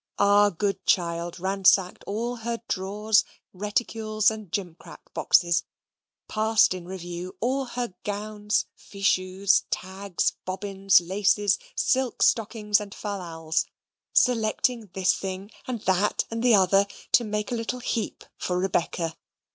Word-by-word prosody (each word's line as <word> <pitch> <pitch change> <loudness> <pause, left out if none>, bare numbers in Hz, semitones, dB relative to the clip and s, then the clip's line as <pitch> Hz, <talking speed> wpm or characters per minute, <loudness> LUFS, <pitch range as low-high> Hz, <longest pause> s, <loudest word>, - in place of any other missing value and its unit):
Our 205 0 +5
good 200 +1 -2
child 170 -1 0
ransacked 190 0 +2
all 235 +4 -2
her 230 0 -4
drawers, 210 +3 +2
cupboards, - - -19 0.2
reticules, 215 +2 0
and 215 -4 -8
gimcrack 180 -4 -7
boxes 170 -2 +3 0.6
passed 220 -1 +3
in 180 -2 -8
review 180 -1 -6
all 265 +4 0
her 240 -4 -4
gowns, 210 0 -1
fichus, 195 0 +1
tags, 190 0 -2
bobbins, 195 0 +2
laces, 200 +2 +2 0.2
silk 260 -2 +1
stockings, 210 -2 +2
and 205 -1 -8
fallals 165 -6 -3 0.4
selecting 230 -1 +2
this 190 -1 +3
thing 195 +2 -5 0.2
and 245 -4 -3
that 190 +1 +1
and 230 0 -3
the 240 -2 +5
other, 195 +1 +4 0.2
to 240 - +5
make 210 0 -3
a - - 0
little 230 +2 -3
heap 235 -2 -3
for 180 - -2
Rebecca. 170 -3 -1
200 Hz, 125 wpm, -26 LUFS, 185-220 Hz, 0.6 s, Our